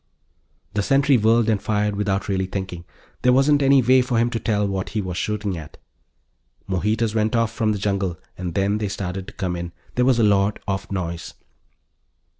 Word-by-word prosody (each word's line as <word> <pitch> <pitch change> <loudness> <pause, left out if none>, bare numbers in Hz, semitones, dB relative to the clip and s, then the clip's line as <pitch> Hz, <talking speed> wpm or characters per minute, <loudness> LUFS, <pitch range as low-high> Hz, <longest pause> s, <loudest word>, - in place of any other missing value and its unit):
The 105 - +1
sentry 135 +5 +3
whirled 115 0 +3
and 105 -3 +1
fired 105 -1 0
without 100 -1 -1
really 95 -1 0
thinking. 95 -3 -5 0.4
There 125 - +4
wasn't 140 +3 +4
any 135 -1 +5
way 130 +2 +5
for 125 -1 -1
him 120 +1 +2
to 115 - -2
tell 105 -2 0
what 95 -1 -3
he - - +2
was 95 -3 -3
shooting 105 0 -2
at. 75 -2 -11 0.9
More 95 -2 -2
heaters 110 +1 0
went 110 +1 +1
off 115 -1 +1
from 110 -2 0
the 105 - -1
jungle, 100 -3 -1 0.2
and 90 -2 -5
then 100 +2 +1
they 105 - -1
started 95 -1 -4
to - - -10
come 90 -4 -3
in. 85 0 -6 0.2
There 125 - +2
was 130 -2 +4
a 115 - +3
lot 100 0 +3
of 95 0 -3
noise. 85 -3 -4
105 Hz, 200 wpm, -22 LUFS, 95-115 Hz, 0.9 s, any